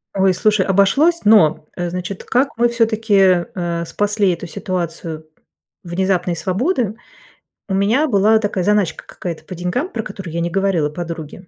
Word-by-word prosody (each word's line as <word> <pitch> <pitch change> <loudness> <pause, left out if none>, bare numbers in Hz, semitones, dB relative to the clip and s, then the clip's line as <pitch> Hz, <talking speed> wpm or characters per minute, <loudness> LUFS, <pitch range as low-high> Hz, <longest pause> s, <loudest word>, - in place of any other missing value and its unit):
Ой, 190 -1 +3
слушай, 210 +2 +2
обошлось, 235 - +3
но, 185 -9 +4
э, 175 -1 -3
значит, 180 +2 -5
как 265 +3 +1
мы 240 +1 +3
всё-таки, 220 -6 +3
э, 170 -2 -2
спасли 205 +2 +1
эту 175 0 -4
ситуацию 165 -2 -4 0.6
внезапной 180 0 -1
свободы. 215 - -1 0.7
У - - -1
меня 215 +11 +2
была 215 -1 +4
такая 205 -3 -1
заначка 205 -3 +1
какая-то 170 -3 -7
по 185 - -8
деньгам, 180 - -2
про 225 -8 -4
которую 195 -6 -8
я 170 - -1
не 170 - -1
говорила 190 -4 +1
подруге. 170 +2 -7
190 Hz, 150 wpm, -19 LUFS, 175-215 Hz, 0.7 s, но